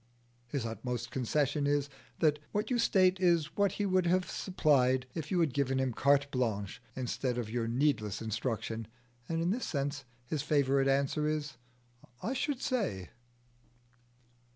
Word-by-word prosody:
His 130 -1 -2
utmost 120 +1 -4
concession 140 +3 0
is, 145 -1 +1 0.3
that 150 -2 +3
what 210 +4 -1
you 245 - +2
state 190 -5 +4
is 170 -4 +2
what 200 -2 +2
he 205 - -1
would 185 -2 +2
have 185 +1 +2
supplied 130 -8 +2
if 155 -2 -5
you 180 - +1
had 155 -6 +1
given 135 -2 +1
him 130 -2 0
carte 140 +3 +3
blanche 110 -6 -2
instead 125 0 -2
of 115 -3 -3
your 115 -1 -1
needless 120 -5 +1
instruction, 110 0 -3 0.4
and 165 0 0
in 175 - +1
this 245 +5 -2
sense 140 -1 -2 0.2
his 145 +4 -2
favourite 140 -2 +2
answer 140 +2 +1
is, 150 -4 -2 0.6
"I 240 - -2
should 275 0 -2
say." 205 - -1
140 Hz, 155 wpm, -32 LUFS, 125-170 Hz, 0.6 s, state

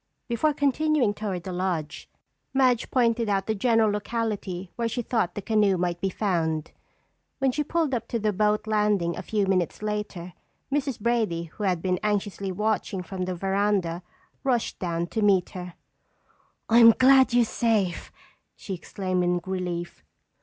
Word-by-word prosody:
Before 245 +6 +1
continuing 285 -4 +1
toward 195 -4 -4
the 185 - -5
lodge, 175 -4 -3 0.5
Madge 255 -3 +3
pointed 235 -3 +2
out 195 -1 +1
the 220 - 0
general 225 0 +3
locality 205 -4 -3
where 235 -1 -1
she 240 +2 -3
thought 210 -7 -1
the 205 - -5
canoe 210 -3 +2
might 175 -1 -2
be 195 - +1
found. 165 -6 -1 0.7
When 270 -1 +2
she 300 +4 -1
pulled 315 -2 0
up 230 -2 -2
to 235 - -2
the 215 -1 0
boat 210 +2 +1
landing 210 -5 +1
a - - -5
few 205 +2 0
minutes 190 +1 0
later, 210 -4 -4 0.4
Mrs. 275 -4 -1
Brady, 215 -7 0
who 170 +5 -6
had 180 -3 0
been 185 -1 0
anxiously 205 -2 -1
watching 210 -1 -1
from 185 +1 -4
the 185 0 -3
veranda, 195 -2 0 0.4
rushed 250 -4 0
down 170 -2 -1
to 220 +5 -3
meet 195 -4 +3
her. 180 -2 -8 0.9
"I'm 230 0 +8
glad 265 0 +6
you're 240 -1 +5
safe!" 215 -7 0 0.4
she 195 - -7
exclaimed 185 0 -2
in 175 0 +1
relief. 180 -2 -4
205 Hz, 160 wpm, -26 LUFS, 180-230 Hz, 0.9 s, I'm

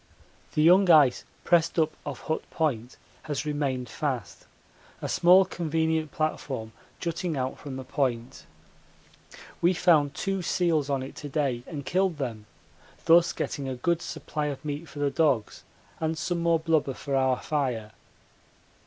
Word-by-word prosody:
The 150 - +3
young 180 +3 +6
ice 150 -6 +5 0.2
pressed 170 -1 +2
up 160 -1 +3 0.2
off 140 -3 -5
Hut 160 - -2
Point 130 -7 -2 0.3
has 145 0 -2
remained 140 -4 -2
fast 130 -8 -4 0.5
a - - -4
small 185 +2 +6
convenient 160 -3 -1
platform 135 -7 -3 0.3
jutting 170 -2 -2
out 130 0 -3
from 140 -2 -7
the 130 - -6
point. 125 -4 -2 1.1
We 175 +2 +3
found 155 -5 +3
two 195 -1 -2
seals 165 -4 +1
on 135 -2 0
it 135 - -9
to 145 - -7
day 135 -5 -1
and 145 -5 -6
killed 185 +1 +1
them 115 -6 -5 0.6
thus 170 +1 +6
getting 135 -2 -4
a 130 - -3
good 170 +7 0
supply 150 -1 -4
of 145 0 -5
meat 150 +2 -4
for 145 - -13
the 145 -1 0
dogs 140 -10 +1 0.4
and 160 0 -1
some 170 +2 -2
more 170 0 +3
blubber 155 -5 +1
for 140 -2 -3
our 130 -1 +2
fire. 125 -8 -2
150 Hz, 155 wpm, -27 LUFS, 135-165 Hz, 1.1 s, young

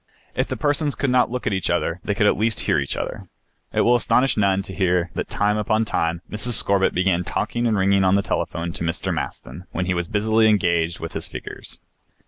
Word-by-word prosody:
If - - -1
the - - -4
persons 145 0 +1
could 140 -3 -1
not 125 0 +3
look 125 +1 -4
at 105 - 0
each 95 -4 -1
other 85 - 0
they 100 - -1
could 105 - +2
at - - +4
least 110 +1 +1
hear 75 - +1
each 70 - -3
other. - - -4 0.5
It - - +1
will 120 - +4
astonish 125 +2 +3
none 100 -2 +2
to 95 - -8
hear 90 -2 +1
that - - -4
time 105 +1 +1
upon 110 +1 +1
time 85 -3 -1
Mrs. 110 +3 0
Scorbitt 100 -3 +3
began 90 -1 +1
talking 120 +6 -2
and 110 -2 +1
ringing 95 0 +3
on 95 +1 +4
the 100 - +2
telephone 85 -2 -2
to 85 - -5
Mr. 80 0 -2
Maston 85 - -6
when 95 - -1
he 90 - 0
was 85 -1 -2
busily 110 +2 +2
engaged 85 -5 +1
with 80 - -6
his - - -3
figures. - - -8
100 Hz, 225 wpm, -22 LUFS, 90-110 Hz, 0.5 s, at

